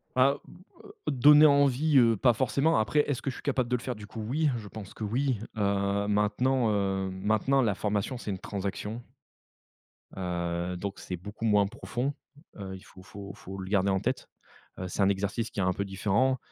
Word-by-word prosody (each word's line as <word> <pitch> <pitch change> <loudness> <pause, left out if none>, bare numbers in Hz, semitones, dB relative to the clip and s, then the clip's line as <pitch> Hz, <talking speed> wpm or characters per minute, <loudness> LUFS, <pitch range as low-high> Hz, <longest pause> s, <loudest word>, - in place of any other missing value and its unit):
Bah, 135 +2 +4
b - - -14 0.3
heu, - - -12 0.2
donner 150 +2 +7
envie, 140 0 +4
heu, 115 -2 +4
pas 120 +3 +4
forcément. 135 +5 +2
Après, 130 +7 +1
est-ce 140 -2 -1
que - - -2
je 130 - -5
suis - - -11
capable 130 -4 0
de 125 - +2
le 120 - -3
faire, 125 0 -4
du 105 -1 -10
coup? 110 - -7
Oui, 150 +4 +1
je 105 -3 -8
pense 100 -1 -9
que, - - -7
oui. 125 +3 0 0.2
Heu, 100 0 +1
maintenant, 110 +4 +2
heu, 95 -1 0
maintenant 110 +8 +1
la 110 -5 +1
formation, 105 +5 -1
c'est 110 - -5
une 95 - -4
transaction, 105 +4 -4 1.1
heu, 85 -1 -2
donc 100 +2 -5
c'est 90 - -5
beaucoup 105 +5 -8
moins 105 -2 +4
profond. 125 +6 -3 0.4
Heu, 95 -2 -6
il - - -12
faut 95 - -15
faut 100 0 -9
faut 95 -1 -9
le 95 0 -6
garder 100 -1 +2
en 95 0 +1
tête. - - -2 0.5
Heu, 95 0 -4
c'est 100 - -1
un 95 - +5
exercice 100 +4 -1
qui 100 - -4
est - - +2
un 90 0 +2
peu 100 - -2
différent. 105 +7 +1
105 Hz, 205 wpm, -28 LUFS, 100-130 Hz, 1.1 s, donner